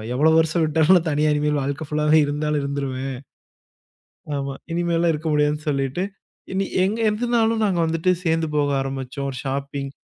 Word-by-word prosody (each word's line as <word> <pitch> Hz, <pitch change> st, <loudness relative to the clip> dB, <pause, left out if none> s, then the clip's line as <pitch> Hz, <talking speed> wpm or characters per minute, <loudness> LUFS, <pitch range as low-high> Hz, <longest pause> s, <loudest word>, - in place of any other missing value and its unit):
எவ்ளோ 155 Hz, +4 st, +4 dB
வருஷம் 160 Hz, +1 st, +1 dB
விட்டாலும் 160 Hz, +3 st, +3 dB
தனியா 150 Hz, +1 st, +2 dB
இனிமேல் 150 Hz, 0 st, +1 dB
வாழ்க்க 140 Hz, +3 st, -3 dB
ஃபுல்லாவே 150 Hz, +1 st, +3 dB
இருந்தாலும் 150 Hz, +1 st, -1 dB
இருந்துருவேன். 135 Hz, -2 st, -3 dB, 1.2 s
ஆமா. 140 Hz, 0 st, -3 dB, 0.2 s
இனிமேலா 170 Hz, 0 st, +1 dB
இருக்க 155 Hz, +1 st, -4 dB
முடியாதுன்னு 150 Hz, +1 st, +1 dB
சொல்லிட்டு 140 Hz, +5 st, -1 dB, 0.5 s
இனி 195 Hz, +1 st, 0 dB, 0.2 s
எங்க 205 Hz, +4 st, 0 dB
எதுனாலும் 225 Hz, 0 st, +1 dB
நாங்க 190 Hz, -5 st, +1 dB
வந்துட்டு 165 Hz, +3 st, +1 dB
சேர்ந்து 165 Hz, -1 st, +1 dB
போக 145 Hz, -1 st, +1 dB
ஆரம்பிச்சோம். 135 Hz, 0 st, -4 dB
ஒரு 130 Hz, -, -6 dB
ஷாப்பிங். 140 Hz, 0 st, -3 dB
150 Hz, 145 wpm, -22 LUFS, 140-165 Hz, 1.2 s, எவ்ளோ